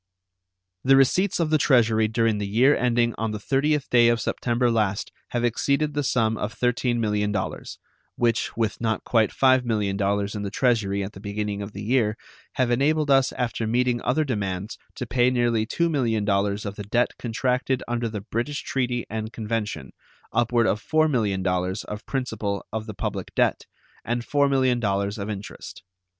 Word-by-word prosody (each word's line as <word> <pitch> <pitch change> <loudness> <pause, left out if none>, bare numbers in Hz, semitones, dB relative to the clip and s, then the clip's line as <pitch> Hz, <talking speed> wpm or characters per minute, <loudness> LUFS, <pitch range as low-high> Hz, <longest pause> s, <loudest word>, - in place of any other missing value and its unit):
The 135 +1 +5
receipts 180 +10 +3
of 160 -2 0
the 155 - +4
Treasury 115 -6 +3
during 110 -1 +1
the 100 - -2
year 125 +8 +4
ending 120 -1 +1
on 115 0 -1
the 105 - -3
30th 140 +6 0
day 120 -1 +6
of 120 -1 +3
September 120 +2 0
last 105 -3 0 0.2
have 120 -1 -2
exceeded 140 +5 +1
the 145 - 0
sum 115 -5 +1
of 105 - -4
$13 125 0 +1
millions, 105 -2 -2 0.4
which, 115 -2 0
with 115 -1 -1
not 110 -1 -1
quite 110 -3 +2
$5 130 -1 +3
millions 105 -4 -1 0.3
in 105 - -4
the 100 - -3
Treasury 100 -5 +1
at 100 +3 -6
the - - -11
beginning 105 0 -3
of 100 +1 -7
the 105 - -6
year, 110 -2 +1 0.4
have 125 -2 +1
enabled 145 +4 +2
us 135 -1 +4
after 115 -2 -2
meeting 120 +1 +1
other 145 +5 +1
demands 100 -6 -3 0.2
to 125 - -4
pay 120 +1 +2
nearly 120 -3 +1
$2 170 +7 +1
millions 105 -6 0
of 100 0 -5
the 105 - -5
debt 120 +2 +2
contracted 125 +2 -1
under 120 -1 -1
the 105 -2 -5
British 120 +8 -3
treaty 125 -2 -1
and 110 0 -4
convention, 110 - -4 0.4
upward 120 -1 +2
of 105 -1 0
$4 155 +3 +2
millions 95 -5 0
of 105 +1 -8
principal 110 -7 -3
of 110 0 -3
the 110 - -7
public - - -4
debt, - - +1 0.4
and 120 +1 -2
$4 145 -1 +2
millions 115 -7 +1
of 100 +2 -4
interest. 100 -3 -8
115 Hz, 170 wpm, -24 LUFS, 105-125 Hz, 0.4 s, day